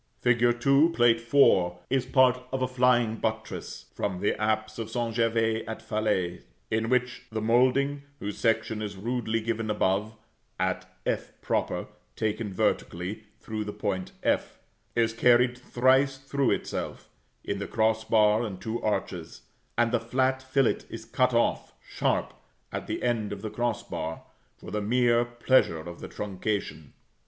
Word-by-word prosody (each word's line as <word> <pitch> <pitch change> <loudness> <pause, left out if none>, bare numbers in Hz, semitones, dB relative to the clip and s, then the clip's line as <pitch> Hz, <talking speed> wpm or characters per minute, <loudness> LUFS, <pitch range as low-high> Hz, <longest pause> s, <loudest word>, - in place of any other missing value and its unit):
Fig. 120 0 +3
2, 140 +6 +4
Plate 120 -1 +5
IV. 95 -11 +5 0.2
is 130 -1 +1
part 130 -1 +4
of 130 0 -1
a - - +1
flying 125 -3 +2
buttress 110 0 -4
from 95 -3 -2
the 105 - +1
apse 110 +1 0
of 115 -1 -4
St. 115 0 -2
Gervais 115 -1 +1
at 110 - -5
Falaise, 105 -5 -1 0.3
in 110 +1 0
which 125 0 0
the 110 - -2
moulding 130 +5 +2 0.2
whose 100 0 -5
section 110 -1 +1
is 100 -2 -5
rudely 115 +1 -1
given 115 0 -2
above 105 +1 0 0.4
at - - 0 0.2
[=f], - - -1 0.9
(taken 110 -1 -2
vertically 95 +3 -1
through 110 -1 -4
the 105 - -5
point 95 -3 -3
f,) - - 0 0.4
is 115 -1 +2
carried 125 +1 +4
thrice 130 +2 +2
through 135 0 0
itself, - - -3 0.4
in - - -3
the - - -4
cross 110 0 +1
bar 110 0 +4
and 100 -6 -4
two 115 +1 -3
arches; 90 -5 -3 0.3
and 120 0 +3
the 120 - +2
flat 130 +3 0
fillet 130 -1 +2
is 115 -1 -8
cut 125 +2 +1
off 120 - +1
sharp - - 0 0.4
at - - -5
the - - -3
end 115 -4 0
of 100 0 -6
the 110 - -4
cross 120 -2 -1
bar, 80 +1 -5 0.3
for - - -10
the 105 +1 -1
mere 120 +2 +3
pleasure 120 -6 +2
of 85 +2 -8
the - - -8
truncation. 100 -6 -4
115 Hz, 155 wpm, -27 LUFS, 105-125 Hz, 0.9 s, Plate